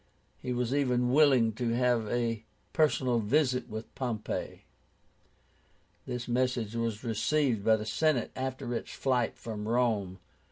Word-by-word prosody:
He 125 - -4
was 125 0 -1
even 125 -3 +2
willing 135 -7 +5
to 115 +1 -1
have 120 -3 +2
a 115 -2 -1 0.3
personal 130 -6 +2
interview 125 +3 +2
with 110 +1 -7
Pompey. 120 -5 -4 1.4
This 125 -1 -4
message 120 -3 0
was 115 -1 -2
received 120 0 +1
by 110 +1 +5
the 110 -1 -4
Senate 150 0 +1
after 130 -2 -3
its 115 - -4
flight 125 -4 0
from 105 -2 -6
Rome. 110 -6 +1
120 Hz, 130 wpm, -30 LUFS, 115-130 Hz, 1.4 s, willing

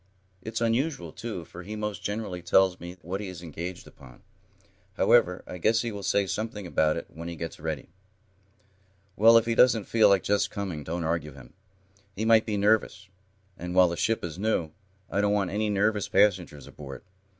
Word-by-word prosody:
It's 110 +3 -4
unusual, 115 - 0
too, 105 -6 -6
for 85 - -10
he 105 +5 -7
most 105 -2 -4
generally 105 -4 -4
tells 95 +1 +3
me 90 +1 -9
what 95 +5 -4
he 105 - -5
is 90 -2 -8
engaged 85 +2 -6
upon. 65 +1 -16 0.7
However, 90 -7 +3
I 90 - -8
guess 115 +6 +2
he 115 - -3
will 100 -1 -6
say 100 +1 +1
something 105 0 -4
about 80 -2 +1
it - - -5
when 85 +2 -8
he 85 - -5
gets 80 0 -6
ready." 80 -3 -4 1.3
"Well, 115 +3 +7
if 115 - +3
he 115 - 0
doesn't 115 -2 +4
feel 110 0 +4
just 100 +2 +1
like - - -20
coming, 95 -7 -4
don't 85 +3 -3
argue 80 -2 -2
him. 65 -3 -14 0.6
He 110 - -2
might 110 0 +5
be 105 -2 -1
nervous, 100 -2 +1 0.5
and, 90 +1 -5
while 90 -1 +6
the 85 - -3
ship 115 +5 0
is 85 0 -5
new, 100 -7 0 0.4
I 100 - +1
don't 105 0 +2
want 100 -3 0
any 105 +1 0
nervous 105 0 +1
passengers 90 -8 +1
aboard. 70 -2 -10
95 Hz, 190 wpm, -27 LUFS, 85-110 Hz, 1.3 s, Well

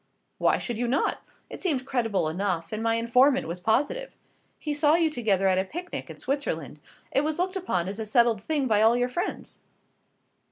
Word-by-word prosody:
"Why - - +3
should 235 -3 -4
you 245 - 0
not? 255 +4 +1 0.3
It - - -9
seemed 285 -9 0
credible 225 -10 0
enough, 170 0 -2
and 215 - -3
my 225 0 +1
informant 250 +4 +3
was 170 +2 -4
positive; 290 - 0 0.4
he 300 - -3
saw 295 +1 +4
you 330 -2 +2
together 205 -8 +1
at 185 -1 +3
a - - +2
picnic 350 - -6
in - - -9
Switzerland. 165 - -3 0.3
It 275 - +3
was 305 +1 -1
looked 370 +2 -1
upon 185 - -1
as 200 +3 -4
a 220 - -3
settled 235 -2 +3
thing 290 +3 -1
by 215 -3 +3
all 225 +2 +5
your 245 0 +1
friends." 345 +8 -4
240 Hz, 195 wpm, -26 LUFS, 200-295 Hz, 0.4 s, all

